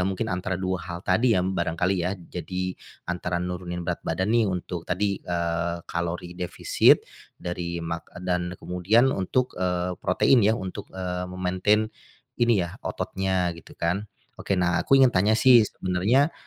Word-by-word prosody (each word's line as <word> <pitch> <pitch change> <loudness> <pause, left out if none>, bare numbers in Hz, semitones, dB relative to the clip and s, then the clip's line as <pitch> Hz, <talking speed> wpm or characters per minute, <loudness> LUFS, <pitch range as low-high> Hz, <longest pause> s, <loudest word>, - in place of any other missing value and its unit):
mungkin 95 +3 -1
antara 90 +1 -2
2 95 -1 -2
hal 85 +1 -7
tadi 110 +4 +3
ya, 90 - +2
barangkali 90 0 0
ya. 90 +3 -1
Jadi, 90 +1 -4 0.3
antara 90 0 -2
nurunin 90 0 -4
berat - - -2
badan 95 +6 -1
nih 115 -3 +3
untuk 90 -2 -4
tadi, 100 +2 0
eee, 85 0 -1
kalori 85 +1 -3
defisit, 90 0 +3 0.3
dari 85 -1 -4
mak 85 +1 -5 0.2
dan 90 -1 -1
kemudian 105 +9 +2
untuk, 125 +7 0
eee, 90 0 0
protein 115 +7 +4
ya 110 +2 +3
untuk, 95 +2 -6
eee, 90 -1 -4
me-maintain, 95 +4 +1 0.5
ini 115 -7 +4
ya, 85 - -9
ototnya 95 -2 -1
gitu 85 - -14
kan. 95 +5 -1 0.3
Oke, 100 - 0
nah 90 -1 +2
aku 135 - +4
ingin 130 -2 +6
tanya 105 +4 +3
sih 125 0 +7
sebenarnya, 105 - +1
90 Hz, 155 wpm, -25 LUFS, 90-100 Hz, 0.5 s, sih